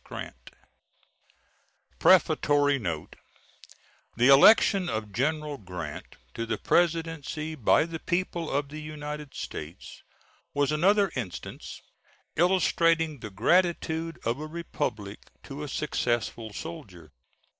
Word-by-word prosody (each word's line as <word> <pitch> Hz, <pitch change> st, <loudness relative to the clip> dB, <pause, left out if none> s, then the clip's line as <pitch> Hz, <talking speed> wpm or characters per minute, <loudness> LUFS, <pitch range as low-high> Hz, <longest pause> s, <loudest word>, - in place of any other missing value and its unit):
GRANT -, -, -9 dB, 1.5 s
Prefatory 145 Hz, -1 st, +4 dB
Note 85 Hz, -8 st, -5 dB, 1.0 s
The 125 Hz, +3 st, +4 dB
election 185 Hz, +6 st, +6 dB
of 110 Hz, -2 st, -3 dB
General 150 Hz, +3 st, -1 dB
Grant 90 Hz, -6 st, -7 dB, 0.2 s
to 115 Hz, -, -4 dB
the 110 Hz, -1 st, -1 dB
Presidency 165 Hz, -1 st, 0 dB
by 150 Hz, +1 st, +3 dB
the 165 Hz, -1 st, -6 dB
people 175 Hz, -2 st, -2 dB
of 140 Hz, 0 st, -1 dB
the 155 Hz, +1 st, -7 dB
United 150 Hz, -1 st, -7 dB
States 80 Hz, +5 st, -8 dB, 0.5 s
was 145 Hz, 0 st, +2 dB
another 195 Hz, +5 st, +3 dB
instance 110 Hz, -9 st, -7 dB, 0.5 s
illustrating 165 Hz, -3 st, +2 dB
the 110 Hz, -, -7 dB
gratitude 165 Hz, -, +1 dB
of 115 Hz, +4 st, -1 dB
a 155 Hz, -, -5 dB
republic 110 Hz, -11 st, -4 dB, 0.2 s
to 140 Hz, +2 st, -8 dB
a 150 Hz, -, -4 dB
successful 120 Hz, -5 st, -2 dB
soldier. 100 Hz, -, -9 dB
150 Hz, 105 wpm, -27 LUFS, 115-165 Hz, 1.5 s, election